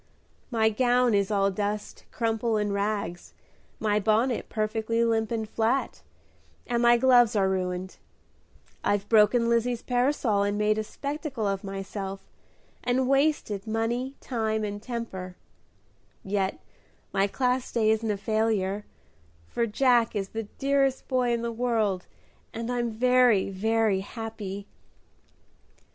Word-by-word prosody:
"My 220 -3 +3
gown 245 +1 +3
is 200 -1 +2
all 200 -1 +2
dust, 205 +2 -4
crumple, 225 -1 0
and 205 -1 0
rags, 200 -4 -3 0.4
my 210 -1 +1
bonnet 220 +4 +1
perfectly 220 +1 0
limp 225 -1 +1
and 225 -2 -2
flat, 230 +5 -1 0.6
and 240 -1 0
my 240 0 +6
gloves 245 -3 +5
are 195 -2 +3
ruined; 185 -1 -2 0.9
I've 205 0 0
broken 230 +2 +5
Lizzie's 235 0 +1
parasol, 245 -5 +1
made 210 +1 +1
a - - -1
spectacle 280 0 -4
of 195 -1 -2
myself, 195 0 -5 0.6
and 250 +1 +1
wasted 275 -8 +1
money, 235 +4 -1
time, 220 -3 -1
and 205 0 -4
temper; 215 -7 -6 0.9
yet 195 -1 -1 0.5
my 195 +1 +2
Class 250 +3 -1
Day 220 -2 +2
isn't 220 0 0
a 205 - 0
failure, 210 -2 0 0.6
for 230 - -1
Jack 235 0 +3
is 195 -2 -2
the 225 -1 -5
dearest 275 -1 +1
boy 250 -2 +1
in 235 0 -1
the 235 - -2
world, 225 -6 0 0.5
and 230 +2 -3
I'm 240 -1 0
very, 240 -3 +3
very 220 0 +1
happy!" 205 -1 -6
220 Hz, 125 wpm, -27 LUFS, 205-240 Hz, 0.9 s, my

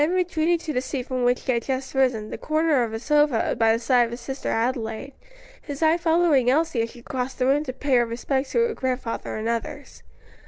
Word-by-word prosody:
Then 325 +5 +2
retreating 345 -2 +1
to 320 -2 -5
the 250 - 0
seat 260 -1 -4
from 255 -2 -2
which 245 0 +1
he - - +1
had 235 -1 +1
just 265 +1 -3
risen, 250 -5 +1
the - - -4
corner 310 -3 +1
of 230 - -3
a 225 - -3
sofa 295 -1 +2
by 225 -1 +3
the 225 - +2
side 240 +1 +3
of - - -6
his 235 +1 -7
sister 270 +2 -5
Adelaide, 230 +2 -2 0.5
his 285 +1 -5
eye 320 +1 +4
following 325 -6 +3
Elsie 300 -2 +2
as 230 - -2
she 240 0 -14
crossed 255 0 -4
the 255 - +1
room 280 +3 +3
to 255 - -3
pay 265 0 +1
her 240 - +3
respects 265 +4 -2
to 470 - +3
her 470 - -2
grandfather 255 - -3
and 215 +1 -3
others. 280 +5 -4
260 Hz, 235 wpm, -24 LUFS, 240-300 Hz, 0.5 s, eye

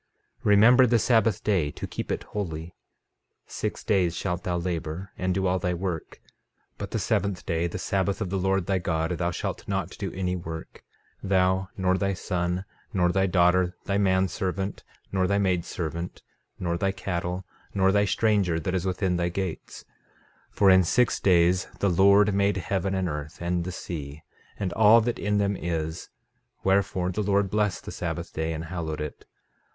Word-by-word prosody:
13:16 - - -24
Remember 115 +5 +7
the 120 0 +4
sabbath 115 -3 +2
day, 95 -8 +2
to - - -6
keep - - -5
it - - -2
holy. 85 -4 -5 0.7
13:17 - - -21
Six - - -3
days 90 -5 +2
shalt 90 -2 -2
thou 90 -1 -1
labor, 85 +1 -4
and 95 0 -1
do 95 0 0
all 95 0 +2
thy 90 0 -1
work; 85 -2 -4
13:18 - - -30 0.5
But 100 - -4
the 115 - -2
seventh 100 -3 -1
day, 85 -1 0
the 85 - -5
sabbath 95 +1 -1
of 95 -5 -3
the 95 - 0
Lord 95 0 +1
thy 95 0 +1
God, 80 -2 -1
thou 85 -1 +1
shalt 85 - -4
not - - -2
do - - -3
any 90 -1 -1
work, 80 -2 -7 0.4
thou, 95 0 +2
nor 95 -1 +1
thy 100 -1 0
son, 90 +1 -2 0.3
nor 90 -5 +2
thy 95 +1 +2
daughter, 90 0 +3
thy 100 0 0
man 95 -1 +3
servant, 95 +2 -3 0.3
nor 95 -1 +1
thy 100 +1 +2
maid 90 -4 +1
servant, 85 0 -5 0.3
nor 85 -1 -2
thy 95 +1 +1
cattle, 90 -1 -3 0.3
nor 95 -1 +4
thy 100 +1 +3
stranger 100 -6 +2
that 90 +3 -3
is 95 0 -1
within 90 -1 0
thy 85 0 0
gates; 90 -1 -5 0.7
13:19 - - -32
For 100 - +5
in 95 0 +6
six 125 +7 +2
days 90 -1 +3
the 100 - +1
Lord 100 +3 +5
made 100 0 +2
heaven 95 0 -1
and 95 -1 0
earth, 75 -1 -5
and 85 0 -1
the 90 - -4
sea, 75 -4 -7 0.3
and 95 -3 -2
all 110 +1 +7
that 120 +1 -2
in 105 0 0
them 100 0 +1
is; 80 -2 -3 0.5
wherefore 95 -2 +1
the 100 - -2
Lord 100 -1 +1
blessed 105 -3 0
the - - -6
sabbath 85 0 -4
day, 80 +1 -2
and 80 0 -4
hallowed 80 -3 -4
it. 75 -1 -6
95 Hz, 190 wpm, -26 LUFS, 85-100 Hz, 0.7 s, Remember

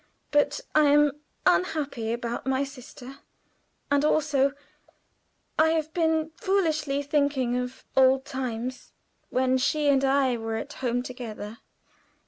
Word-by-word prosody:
But 290 -1 +2
I 305 -1 +5
am 295 0 +5 0.3
unhappy 285 -10 +1
about 235 +1 -4
my 265 +1 +1
sister, 270 0 -10 0.7
and 285 0 +3
also 285 -3 +2 1.1
I 320 0 +5
have 315 -1 -2
been 320 -2 +1
foolishly 310 -7 0
thinking 280 -4 +1
of 250 +1 -4
old 265 0 +4
times, 255 -1 -5 0.4
when 260 0 +2
she 290 +3 +1
and 275 -1 +3
I 270 -2 +2
were 225 0 -3
at 275 +6 -5
home 245 -2 -1
together." 230 -3 -7
275 Hz, 120 wpm, -26 LUFS, 250-295 Hz, 1.1 s, I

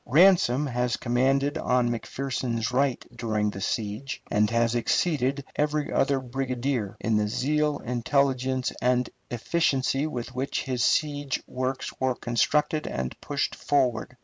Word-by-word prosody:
Ransom 150 -3 +5
has 125 -2 -1
commanded 135 +4 +1
on 125 -1 +2
McPherson's 120 -1 -2
right 130 0 +1
during 105 -2 0
the 95 - -7
siege, 110 +7 -3
and 105 0 +3
has 115 0 +2
exceeded 140 +2 +1
every 150 0 0
other 135 0 +2
brigadier 130 -3 -2
in 110 -1 +1
the 105 0 +1
zeal, 150 +6 +1
intelligence, 130 +1 +1
and 125 0 +2 0.2
efficiency 135 +2 +1
with 125 -3 -5
which 130 +2 -2
his 125 -3 -1
siege 145 -2 +1
works 130 +1 -3
were 130 -1 +1
constructed 150 +7 +1
and 65 0 -3
pushed - - -1
forward. 130 -3 0
130 Hz, 130 wpm, -26 LUFS, 120-140 Hz, 0.2 s, Ransom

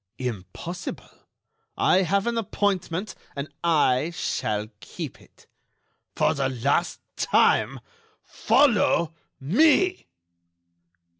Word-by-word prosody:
"Impossible; 125 - -7 0.5
I 185 - +4
have 195 +2 +1
an 235 0 -1
appointment 195 -3 -1 0.2
and 140 +1 -5
I 150 -3 +2
shall 105 -9 -2
keep 145 - -8
it." - - -22 0.7
"For - - +2
the 135 -1 -1
last 140 +7 0 0.2
time—follow 290 - +1 0.3
me!" 315 - +3
170 Hz, 80 wpm, -25 LUFS, 135-210 Hz, 0.7 s, I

